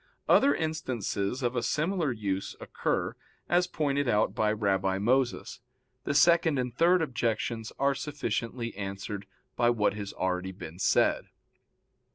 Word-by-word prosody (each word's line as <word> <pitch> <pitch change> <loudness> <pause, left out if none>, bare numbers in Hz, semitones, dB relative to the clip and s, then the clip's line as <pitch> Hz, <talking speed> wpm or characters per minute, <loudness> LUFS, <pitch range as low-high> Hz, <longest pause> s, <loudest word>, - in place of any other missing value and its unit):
Other 280 - +5
instances 130 - -2
of 120 +1 0
a 120 - +1
similar 160 +1 0
use 100 -4 -3
occur, - - -2 0.3
as 175 +1 +3
pointed 145 -5 0
out 105 -3 +2
by 105 -1 +1
Rabbi 95 -3 +1
Moses. 125 +5 0 0.5
The - - -1
second 170 0 +5
and 125 -2 -2
third 175 +3 +4
objections 115 -4 -2
are 140 0 +2
sufficiently 120 -5 -3
answered 100 0 -5 0.3
by 120 - +3
what 110 -5 +2
has 100 -1 -5
been - - -20
already 90 -2 -3
said. - - +2
120 Hz, 135 wpm, -29 LUFS, 100-145 Hz, 0.5 s, Other